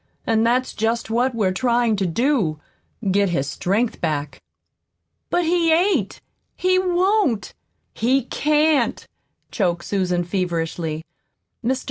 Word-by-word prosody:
"And 225 -1 +2
that's 250 +2 +1
just 225 +1 -1
what 245 +2 +1
we're 200 -5 +1
trying 235 +2 +1
to 190 -1 0
do 200 - 0 0.5
get 200 0 +2
his 150 -6 0
strength 200 - -1
back." 150 -3 -2 0.9
"But 350 -1 +1
he 335 0 +2
ain't 325 - +1 0.4
he 370 0 +2
won't 370 - +1 0.4
he 255 +4 +1
can't," 300 -1 +1 0.5
choked 175 -5 -1
Susan 180 -3 0
feverishly. 170 -3 -2 0.6
"Mr. 255 +3 0
230 Hz, 115 wpm, -22 LUFS, 180-285 Hz, 0.9 s, And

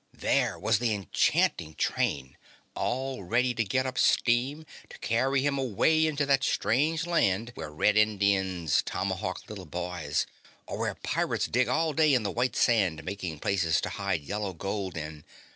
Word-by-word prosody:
There - - +1
was - - +1
the 115 -3 +1
enchanting 80 -4 +1
train 65 -2 -1 0.4
all 130 -2 -2
ready 120 +7 +1
to 115 - 0
get 130 +6 0
up 130 -1 -3
steam 130 +6 +2 0.2
to - - -11
carry 130 +4 +1
him 140 -1 +1
away 155 +6 +2
into 150 -2 0
that 135 -2 +2
strange 155 +10 +1
land 115 - +1
where - - -7
red 105 +7 +2
Indians 100 -6 +2
tomahawk - - -3
little 95 -4 -8
boys, 85 -3 -2 0.4
or - - -6
where - - -1
pirates - - -1
dig 125 0 +1
all 155 +5 +1
day 155 -1 +4
in 120 - +1
the 100 - -2
white 125 +2 0
sand 95 -10 +2
making 90 -2 -5
places 85 -4 +1
to - - -2
hide 100 -5 -2
yellow 100 +3 -3
gold 95 0 -4
in. 75 -1 -6
110 Hz, 160 wpm, -28 LUFS, 95-130 Hz, 0.4 s, day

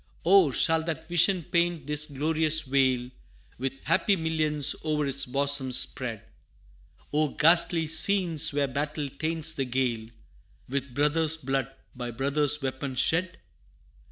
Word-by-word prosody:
Oh! 185 -3 +5
shall 160 +4 +1
that 165 -2 -5
vision 175 +2 +3
paint 170 -1 -1
this 150 +1 +2
glorious 155 +2 +1
vale 130 -3 0 0.5
With 135 +1 -3
happy 180 +5 +1
millions 155 -4 -1
o'er 150 -2 -1
its 140 -1 -2
bosom 140 0 +1
spread 120 -3 0 0.9
Or 150 -1 -1
ghastly 165 0 +3
scenes 160 -1 +3
where 140 -1 -1
battle 145 +2 -4
taints 160 +2 -1
the 135 - -3
gale 120 -3 -2 0.6
With 135 -1 -5
brother's 155 +2 +1
blood 135 -3 -3 0.3
by 125 -1 -6
brother's 140 +4 0
weapon 130 0 -4
shed? 170 +7 0
150 Hz, 130 wpm, -26 LUFS, 135-160 Hz, 0.9 s, Oh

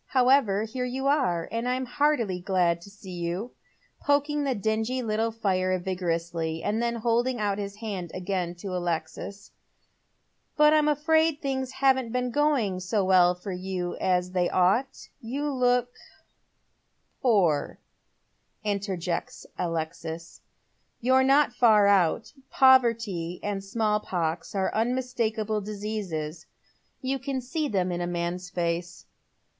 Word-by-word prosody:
However, 250 -6 +3
here 245 +3 -4
you 260 +2 -3
are, 260 - +1
and 230 +2 -1
I'm 255 +1 -1
heartily 245 -8 +1
glad 175 -2 +1
to 200 - -12
see 200 -2 -12
you," 175 +6 -3 0.5
poking 290 +1 +1
the 265 -2 0
dingy 220 +4 -1
little 220 0 0
fire 185 -4 0
vigorously, 170 -3 -2
and 220 +2 0
then 235 0 0
holding 235 +2 0
out 205 -1 0
his 200 0 -5
hand 205 -5 -5
again 180 -1 -2
to 185 +1 -5
Alexis; 175 +3 -4 0.5
" - - -46
but 300 0 +6
I'm 305 -1 +4
afraid 315 +1 +2
things 265 -2 -3
haven't 260 -3 +2
been 250 0 -1
going 270 -10 +1
so 190 +2 0
well 180 -1 +4
with 185 -3 -4
you 180 -1 -3
as 180 -1 0
they 180 -1 +1
ought. 195 +9 +1
You 280 +6 -3
look 250 -2 +2 0.5
" - - -46
" - - -46
Poor," 185 - +2 0.9
interjects 195 -4 -3
Alexis. 165 -1 -4 0.3
" - - -45
You're 260 +2 +4
not 275 0 +4
far 220 -4 +5
out. 200 +1 +2 0.2
Poverty 230 -10 +3
and 205 -1 -2
«malI 215 -2 +2
pox 170 +1 -3
are 190 -1 0
unmistakable 225 -3 -1
diseases. 195 -7 -5 0.6
You 265 +1 -1
can 270 0 -3
see 300 +5 -2
them 185 -7 0
in 175 0 -2
a 175 - -1
man's 175 +1 -3
face. 175 -1 -3
210 Hz, 140 wpm, -27 LUFS, 180-250 Hz, 0.9 s, but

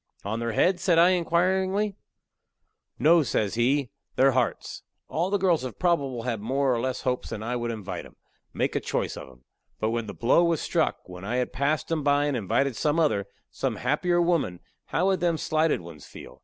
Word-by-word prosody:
"On 110 +3 -2
their 115 -1 -2
heads?" 180 - +2
says 180 -4 +3
I, 175 +2 +6
inquirin'ly. 185 +3 +1 1.0
"No," 165 +2 +5
says 110 -7 -1
he, 125 +2 +1 0.2
"their 135 +1 +5
hearts. 125 -2 -1 0.3
All 170 +5 -1
the 205 - +2
girls 180 -6 +2
have 130 -3 -6
probable 140 -9 0
had 115 -4 -2
more 135 +4 +1
or 120 - 0
less 130 0 -2
hopes 125 -1 -2
that 110 - -5
I 120 +2 -2
would 120 -1 -2
invite 110 -4 -5
'em - - -21 0.4
make - - -1
a - - +2
choice - - -2
of - - -9
'em. 65 0 -20 0.3
But 110 +1 0
when 115 -1 -2
the - - -7
blow 130 +8 +3
was 170 -2 +1
struck, - - -1
when 90 0 -10
I 110 +5 -2
had 125 0 -1
passed 140 +1 -1
'em 160 -2 0
by 145 0 +2
and 145 -2 0
invited 120 +4 0
some 150 +6 +1
other, 100 -11 +1 0.2
some - - -2
happier 175 -1 +1
woman, 170 - 0 0.2
how 180 - 0
would 190 -1 +2
them 170 -2 +1
slighted 155 - +1
ones 80 -4 -12
feel? - - -12
140 Hz, 205 wpm, -26 LUFS, 115-170 Hz, 1.0 s, I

